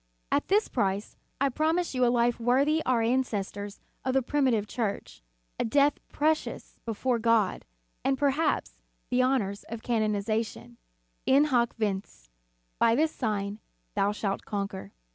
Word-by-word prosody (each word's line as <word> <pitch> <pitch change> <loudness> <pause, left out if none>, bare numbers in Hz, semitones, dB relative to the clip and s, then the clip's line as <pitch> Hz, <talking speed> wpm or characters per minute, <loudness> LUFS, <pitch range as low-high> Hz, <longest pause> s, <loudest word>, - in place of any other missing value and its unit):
At - - +1
this 415 +3 +3
price, 200 -3 -1 0.2
I 275 +1 +3
promise 320 +6 0
you 255 -1 +1
a - - +5
life 240 0 +2
worthy 275 +7 +3
our 245 -3 +3
ancestors 205 -4 -1 0.2
of 260 0 -1
the 270 - +3
primitive 255 -6 +1
Church, 205 - -3 0.4
a - - +2
death 285 +5 +3
precious 310 +1 -1
before 235 +2 0
God, 230 -4 +2 0.4
and, 270 0 +2
perhaps, 285 +3 0 0.3
the 250 0 +3
honors 225 -6 0
of 225 0 -7
canonization: 215 - -1 0.5
In 275 +2 +6
hoc 245 -6 +2
vince: 195 - -3 0.5
By 230 0 +5
this 310 +4 +2
sign 210 -5 -2 0.3
thou 200 - +2
shalt 205 -1 -2
conquer. 200 - -4
235 Hz, 140 wpm, -28 LUFS, 205-270 Hz, 0.5 s, In